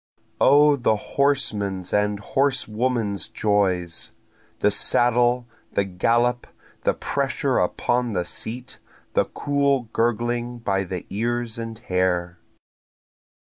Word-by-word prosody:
O 145 Hz, +2 st, +6 dB
the 115 Hz, -3 st, +2 dB
horseman's 105 Hz, -8 st, -1 dB
and 105 Hz, 0 st, +1 dB
horsewoman's 120 Hz, -4 st, 0 dB
joys! 95 Hz, -6 st, 0 dB, 0.4 s
The 105 Hz, -, +2 dB
saddle, 120 Hz, +3 st, +3 dB, 0.3 s
the 100 Hz, -, +2 dB
gallop, 120 Hz, +6 st, +1 dB, 0.4 s
the -, -, +2 dB
pressure 140 Hz, -1 st, -1 dB
upon 120 Hz, +6 st, 0 dB
the 90 Hz, -2 st, -1 dB
seat, 125 Hz, +8 st, -5 dB, 0.3 s
the -, -, +3 dB
cool 140 Hz, -4 st, 0 dB
gurgling 120 Hz, +1 st, 0 dB
by 95 Hz, -4 st, -1 dB
the 90 Hz, 0 st, -5 dB
ears 115 Hz, +2 st, -2 dB
and 115 Hz, -1 st, -6 dB
hair. 90 Hz, -5 st, -1 dB
115 Hz, 100 wpm, -23 LUFS, 100-125 Hz, 0.4 s, O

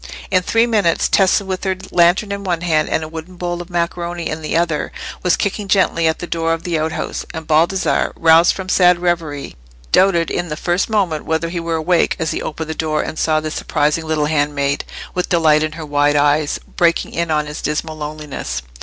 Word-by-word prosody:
In 185 Hz, -1 st, +4 dB
three 225 Hz, +5 st, +2 dB
minutes 205 Hz, -8 st, +2 dB
Tessa 195 Hz, +1 st, +3 dB
with 190 Hz, -1 st, -4 dB
her 190 Hz, -1 st, -1 dB
lantern 180 Hz, +4 st, +3 dB
in 200 Hz, 0 st, -4 dB
one 175 Hz, -3 st, -1 dB
hand 155 Hz, -3 st, +1 dB
and 160 Hz, -, 0 dB
a -, -, -5 dB
wooden 165 Hz, +3 st, -9 dB
bowl 175 Hz, 0 st, -3 dB
of 175 Hz, -, -10 dB
macaroni 170 Hz, 0 st, -2 dB
in 155 Hz, +1 st, -4 dB
the 155 Hz, +1 st, -1 dB
other, 165 Hz, -3 st, 0 dB, 0.3 s
was 180 Hz, -, +3 dB
kicking 200 Hz, 0 st, -2 dB
gently 185 Hz, -4 st, +2 dB
at 160 Hz, -, +1 dB
the -, -, -5 dB
door 165 Hz, -1 st, -1 dB
of 165 Hz, -, -4 dB
the 170 Hz, -3 st, -1 dB
outhouse; 160 Hz, +1 st, -3 dB
and 160 Hz, 0 st, -6 dB
Baldassarre, 165 Hz, +5 st, +2 dB
roused 165 Hz, +1 st, +5 dB
from 190 Hz, -1 st, -6 dB
sad 180 Hz, -2 st, +4 dB
reverie, 170 Hz, -5 st, -2 dB, 0.4 s
doubted 175 Hz, -4 st, +3 dB
in 175 Hz, -, -2 dB
the 150 Hz, -, -4 dB
first 175 Hz, +4 st, 0 dB
moment 185 Hz, -8 st, 0 dB
whether 160 Hz, +1 st, -1 dB
he 170 Hz, 0 st, -3 dB
were 165 Hz, 0 st, -2 dB
awake 170 Hz, +2 st, +2 dB
as 160 Hz, -1 st, -1 dB
he -, -, -3 dB
opened 160 Hz, +1 st, -4 dB
the -, -, -2 dB
door 155 Hz, -1 st, -1 dB
and 155 Hz, -, -5 dB
saw 155 Hz, -1 st, +2 dB
this 155 Hz, 0 st, -4 dB
surprising 150 Hz, +2 st, 0 dB
little 155 Hz, -1 st, +1 dB
handmaid, 145 Hz, -2 st, 0 dB, 0.3 s
with 180 Hz, -, -2 dB
delight 155 Hz, -3 st, +4 dB
in 155 Hz, 0 st, -1 dB
her 155 Hz, 0 st, -7 dB
wide 145 Hz, 0 st, +2 dB
eyes, 145 Hz, +1 st, +2 dB, 0.2 s
breaking 170 Hz, -1 st, +2 dB
in 170 Hz, 0 st, -1 dB
on 150 Hz, -1 st, +1 dB
his 150 Hz, +1 st, -7 dB
dismal 155 Hz, +1 st, -2 dB
loneliness. 150 Hz, -, -5 dB
165 Hz, 210 wpm, -18 LUFS, 155-175 Hz, 0.4 s, roused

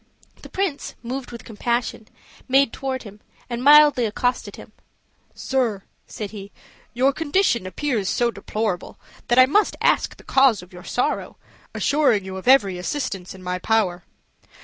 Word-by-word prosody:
The -, -, -12 dB
prince, 370 Hz, -7 st, -3 dB
moved 255 Hz, +2 st, -5 dB
with 235 Hz, -, -9 dB
compassion, 235 Hz, 0 st, -3 dB, 0.4 s
made 270 Hz, -1 st, +3 dB
toward 265 Hz, -1 st, -4 dB
him, 205 Hz, -1 st, -12 dB, 0.3 s
and 240 Hz, +1 st, -3 dB
mildly 295 Hz, -3 st, +7 dB
accosted 225 Hz, -1 st, -2 dB
him. -, -, -13 dB, 0.6 s
"Sir," 235 Hz, -7 st, -1 dB, 0.2 s
said 210 Hz, -2 st, -6 dB
he, 200 Hz, -2 st, -9 dB, 0.4 s
"your 265 Hz, +3 st, +3 dB
condition 290 Hz, -, +1 dB
appears 225 Hz, -2 st, -2 dB
so 240 Hz, -1 st, +1 dB
deplorable 210 Hz, -5 st, -4 dB, 0.3 s
that 240 Hz, -, +2 dB
I 255 Hz, -, +9 dB
must 405 Hz, +11 st, +2 dB
ask -, -, +1 dB
the -, -, -16 dB
cause 265 Hz, -8 st, +3 dB
of 180 Hz, -, -17 dB
your 180 Hz, 0 st, -11 dB
sorrow, 245 Hz, -, -2 dB, 0.4 s
assuring 280 Hz, -9 st, +2 dB
you 190 Hz, 0 st, -6 dB
of 190 Hz, -, -9 dB
every 200 Hz, -9 st, +4 dB
assistance 190 Hz, -4 st, -4 dB
in 185 Hz, -, -13 dB
my 180 Hz, 0 st, -3 dB
power." 185 Hz, -4 st, 0 dB
235 Hz, 150 wpm, -22 LUFS, 200-270 Hz, 0.6 s, I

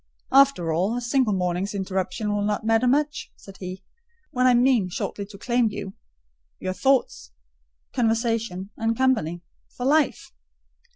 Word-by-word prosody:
"After 270 Hz, -12 st, +4 dB
all, 190 Hz, +8 st, 0 dB
a -, -, 0 dB
single 240 Hz, -1 st, +1 dB
morning's 180 Hz, +2 st, -1 dB
interruption 195 Hz, +2 st, -2 dB
will 205 Hz, -, 0 dB
not 210 Hz, +1 st, -1 dB
matter 225 Hz, +2 st, +3 dB
much," 295 Hz, +4 st, 0 dB
said 195 Hz, -1 st, -14 dB
he, 185 Hz, +1 st, -7 dB, 0.5 s
"when 255 Hz, -2 st, +2 dB
I 250 Hz, -, +5 dB
mean 240 Hz, -6 st, +3 dB
shortly 200 Hz, +3 st, -4 dB
to 200 Hz, -1 st, -12 dB
claim 240 Hz, +2 st, +1 dB
you—your 60 Hz, -, -9 dB
thoughts, 265 Hz, -, +1 dB, 0.6 s
conversation, 225 Hz, -5 st, -1 dB
and 225 Hz, 0 st, -1 dB
company—for 220 Hz, -2 st, -2 dB
life." 295 Hz, +1 st, +1 dB
215 Hz, 130 wpm, -24 LUFS, 185-250 Hz, 0.6 s, I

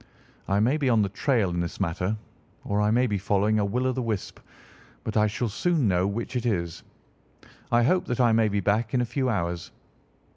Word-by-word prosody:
I 100 Hz, +1 st, +2 dB
may 125 Hz, +8 st, +2 dB
be 140 Hz, -4 st, +1 dB
on 115 Hz, -3 st, +4 dB
the 100 Hz, -, -1 dB
trail 105 Hz, -1 st, +1 dB
in 85 Hz, -, -2 dB
this 85 Hz, -1 st, -4 dB
matter, 90 Hz, +5 st, -1 dB, 0.5 s
or 100 Hz, 0 st, 0 dB
I 105 Hz, -, +2 dB
may 120 Hz, +3 st, +3 dB
be 105 Hz, -5 st, -1 dB
following 105 Hz, +2 st, +1 dB
a -, -, +2 dB
will 125 Hz, +6 st, -1 dB
o' 130 Hz, -, +2 dB
the 130 Hz, 0 st, -2 dB
wisp, 110 Hz, -5 st, -3 dB, 0.6 s
but 110 Hz, -, -4 dB
I 105 Hz, -1 st, +4 dB
shall 115 Hz, +3 st, -2 dB
soon 155 Hz, -, +1 dB
know 90 Hz, 0 st, +2 dB
which 115 Hz, +5 st, -4 dB
it 125 Hz, -, -1 dB
is. 85 Hz, -7 st, -2 dB, 0.9 s
I 120 Hz, 0 st, +4 dB
hope 180 Hz, +9 st, +2 dB
that 125 Hz, -1 st, -3 dB
I 120 Hz, -2 st, +4 dB
may 110 Hz, 0 st, +3 dB
be 100 Hz, -1 st, 0 dB
back 110 Hz, +5 st, 0 dB
in 125 Hz, -, +3 dB
a -, -, +1 dB
few 130 Hz, +2 st, -1 dB
hours." 85 Hz, -6 st, -2 dB
110 Hz, 220 wpm, -26 LUFS, 100-125 Hz, 0.9 s, on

